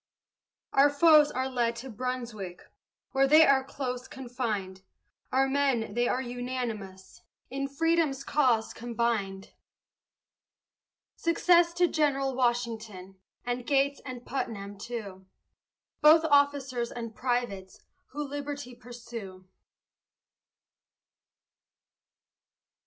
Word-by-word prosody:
Our 275 +2 +6
foes 300 0 +6
are 260 +1 -2
fled 235 -2 0
to 250 +3 -8
Brunswick, 230 -6 -5 0.5
Where 270 0 +3
they 310 +3 +7
are 270 -2 +4
close 255 -2 -5
confined; 235 -8 -4 0.5
Our 265 +1 +3
men 270 -5 0
they 240 +1 +1
are 255 +1 0
unanimous, 240 -6 -6 0.3
In 275 +1 -2
Freedom's 305 -1 +1
cause 250 -7 +1
combined. 225 -5 -2 1.6
Success 340 0 +3
to 355 0 +4
General 275 -4 +1
Washington, 225 -6 -2 0.3
And 245 0 -2
Gates 280 0 +2
and 255 -2 -8
Putnam, 205 -6 -5
too, 200 -5 -7 0.7
Both 320 +2 +7
officers 280 -5 +2
and 230 -2 -6
privates, 240 -7 -3 0.3
Who 295 +2 -5
liberty 285 -2 -6
pursue. 230 -6 -10
250 Hz, 95 wpm, -28 LUFS, 230-280 Hz, 1.6 s, they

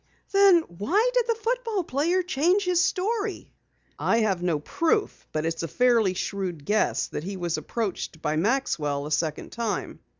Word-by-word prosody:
"Then 390 -3 +6
why 325 - 0
did - - +2
the 460 - +2
football 455 -3 -1
player 335 +6 +1
change 360 +4 +2
his 360 -1 +3
story?" 410 +2 -2 0.5
"I 230 - +2
have 195 -5 +1
no 175 -3 +1
proof, 335 - -1
but 155 0 -2
it's 165 0 -2
a 165 - -2
fairly 230 - +3
shrewd 180 -6 -4
guess 215 +1 +1
that 150 - -5
he 195 +2 -5
was 175 -2 -1
approached 205 -7 -4
by 150 0 -1
Maxwell 155 - 0
a 150 - -6
second 155 0 -1
time. 230 -3 -3
235 Hz, 165 wpm, -26 LUFS, -, 0.5 s, Then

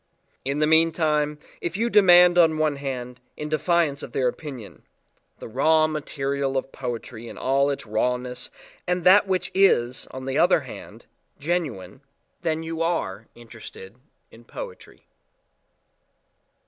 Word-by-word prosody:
In 140 +2 -2
the 150 - +3
meantime, 155 -2 +2 0.2
if 170 - -3
you 230 +2 +1
demand 180 -5 +6
on 165 -3 +4
one 155 -2 0
hand, 125 -3 -5 0.2
in 150 - -5
defiance 155 -2 +1
of - - -9
their 130 -2 +1
opinion 125 -4 -7 0.6
the - - -9
raw 155 +7 +3
material 140 -3 -2
of 135 0 -3
poetry 120 -2 -6
in - - -9
all 135 +2 +1
its 140 - -4
rawness 125 +3 -2 0.4
and 180 0 0
that 195 +3 +6
which 185 -1 -1
is, 130 -11 +2
on 130 0 -8
the 135 - -1
other - - +4
hand, - - -11 0.3
genuine 140 - -3 0.4
then 160 -1 -1
you 165 0 -5
are 115 - -2
interested 115 -4 -12 0.4
in 115 - -16
poetry. - - -10
145 Hz, 135 wpm, -24 LUFS, 125-165 Hz, 0.6 s, demand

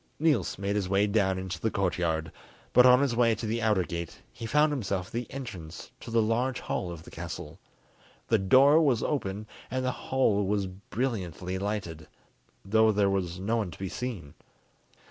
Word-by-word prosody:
Niels 155 -1 +1
made 100 +1 -2
his 100 -3 -1
way 100 +1 +3
down 100 -2 +1
into 95 -1 -5
the 110 - 0
courtyard, 85 -5 -1 0.4
but 125 0 +8
on 125 +1 +7
his 135 -4 +1
way 115 -1 +3
to 110 - -5
the 115 +2 -1
outer 105 -4 +2
gate 85 -2 -6
he 115 0 -6
found 150 +4 +3
himself 100 -9 -2
at - - -17
the 120 +1 -4
entrance 95 - -8
to - - -9
the 115 -1 +3
large 120 +4 0
hall 90 - -3
of 85 -2 -8
the - - -13
castle. 85 -2 -7 0.7
The 115 - +3
door 135 +11 +6
was 130 -8 +2
open, 105 -8 -2 0.2
and 130 +1 -2
the 130 - +1
hall 120 -6 +1
was 100 -1 0
brilliantly 95 -2 -4
lighted, 95 -6 -4 0.6
though 110 +2 +4
there 100 -1 +2
was 90 -2 -2
no 110 +5 0
one 105 -5 -1
to 85 - -11
be 95 -1 -4
seen. 105 - -5
105 Hz, 185 wpm, -28 LUFS, 95-120 Hz, 0.7 s, but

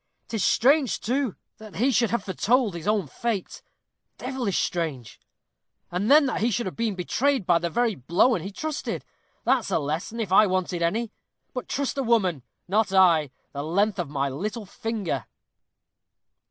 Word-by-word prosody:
'Tis 220 -4 -1
strange, 275 0 +3
too, 255 -1 -1 0.2
that 215 -2 -11
he 255 +6 +2
should 235 -2 +2
have 235 -4 -1
foretold 220 +3 +1
his 170 +2 -7
own 210 -4 +2
fate 215 - -3 0.6
devilish 255 -6 -2
strange! 155 -9 -2 0.7
And 185 +5 -1
then 295 +1 +7
that 265 - -1
he 230 - +3
should 240 +1 -1
have 185 - -5
been 225 -3 -1
betrayed 245 +6 0
by 170 -1 +4
the 170 0 -2
very 235 +5 +1
blowen 175 - +2
he 195 +5 -6
trusted! 310 +8 -4 0.4
that's 250 -3 +2
a 190 - +2
lesson, 160 +10 -3
if 210 -5 -3
I 210 +2 +7
wanted 185 -2 -1
any. 215 +7 0 0.4
But 250 - -5
trust 280 0 -1
a - - +1
woman! 195 - +2 0.3
not 205 +2 +1
I, 170 -6 +5 0.2
the 140 - -4
length 195 +6 +1
of 170 -5 -2
my 140 -1 -1
little 210 - -4
finger." 200 - -3
205 Hz, 165 wpm, -25 LUFS, 175-235 Hz, 0.7 s, then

